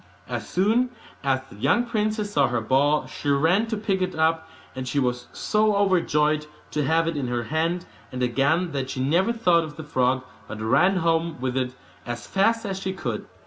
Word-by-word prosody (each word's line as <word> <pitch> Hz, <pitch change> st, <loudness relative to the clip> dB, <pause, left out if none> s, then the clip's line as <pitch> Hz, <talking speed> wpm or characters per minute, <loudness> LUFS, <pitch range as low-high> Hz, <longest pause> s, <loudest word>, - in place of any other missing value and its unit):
As -, -, -5 dB
soon 225 Hz, +7 st, +2 dB, 0.3 s
as 135 Hz, -1 st, +1 dB
the 100 Hz, -, -14 dB
young 140 Hz, -, +2 dB
princess 215 Hz, -2 st, -1 dB
saw 140 Hz, -2 st, +4 dB
her 120 Hz, -1 st, 0 dB
ball, 140 Hz, +6 st, +2 dB
she 145 Hz, -, -5 dB
ran 165 Hz, +10 st, +3 dB
to 220 Hz, -1 st, -2 dB
pick 200 Hz, -3 st, -1 dB
it 185 Hz, 0 st, -1 dB
up; 160 Hz, 0 st, +1 dB, 0.3 s
and 130 Hz, 0 st, -5 dB
she 145 Hz, -, -2 dB
was 125 Hz, -2 st, 0 dB
so 215 Hz, 0 st, +1 dB
overjoyed 155 Hz, -6 st, +2 dB, 0.2 s
to 150 Hz, -, 0 dB
have 165 Hz, +3 st, +2 dB
it 165 Hz, -, -1 dB
in 140 Hz, -3 st, -2 dB
her 120 Hz, -1 st, -1 dB
hand 165 Hz, +8 st, -1 dB, 0.3 s
again, 135 Hz, +8 st, +1 dB
that 135 Hz, -3 st, -3 dB
she 130 Hz, -, -4 dB
never 170 Hz, -, +2 dB
thought 180 Hz, -8 st, +3 dB
of 150 Hz, -2 st, -8 dB
the 155 Hz, -, -7 dB
frog, 130 Hz, -3 st, +1 dB, 0.2 s
but 110 Hz, -, -7 dB
ran 175 Hz, -, +3 dB
home 165 Hz, -2 st, +1 dB
with 130 Hz, 0 st, -2 dB
it 130 Hz, -1 st, -1 dB, 0.3 s
as 120 Hz, 0 st, -5 dB
fast 225 Hz, -, +1 dB
as 195 Hz, -1 st, -3 dB
she 190 Hz, -1 st, -3 dB
could. 120 Hz, -, -4 dB
160 Hz, 195 wpm, -24 LUFS, 130-190 Hz, 0.3 s, saw